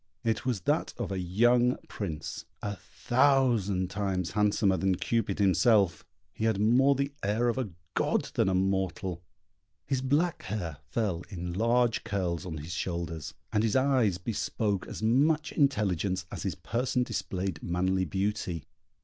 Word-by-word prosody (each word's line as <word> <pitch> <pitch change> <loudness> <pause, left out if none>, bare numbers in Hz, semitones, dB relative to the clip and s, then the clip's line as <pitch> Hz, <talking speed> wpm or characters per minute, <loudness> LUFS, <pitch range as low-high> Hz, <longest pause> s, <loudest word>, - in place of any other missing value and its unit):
It 115 +3 -1
was 120 -7 0
that - - 0
of - - -3
a 95 - -2
young 120 +7 +3
Prince, 80 -7 -5 0.2
a 105 -1 -2
thousand 120 -8 +2
times 95 -3 -1
handsomer 105 -2 +2
than 95 +1 +1
Cupid 105 0 -1
himself; 95 -1 +3 0.3
he 110 - -2
had 110 -3 +2
more 130 +6 +4
the 140 +1 -1
air 110 +4 +1
of 120 - -1
a 125 -5 -2 0.2
god - - 0
than 95 - +2
a 95 - +1
mortal; 95 -2 -1 0.6
his 135 -2 -1
black 150 +6 +1
hair 90 -7 -4
fell 95 - -1
in 90 -1 -5
large 115 +3 +2
curls 90 -3 -2
on 80 -3 -5
his 80 +3 -6
shoulders, 85 -4 -4 0.2
and 105 - +3
his 110 -2 +1
eyes 130 -8 +3
bespoke 100 0 -2
as - - -7
much 145 +7 +3
intelligence 100 - +1
as - - -5
his - - -2
person 125 +2 -1
displayed 95 -7 -3
manly 95 +2 0
beauty. 95 -2 -2
100 Hz, 150 wpm, -29 LUFS, 90-120 Hz, 0.6 s, more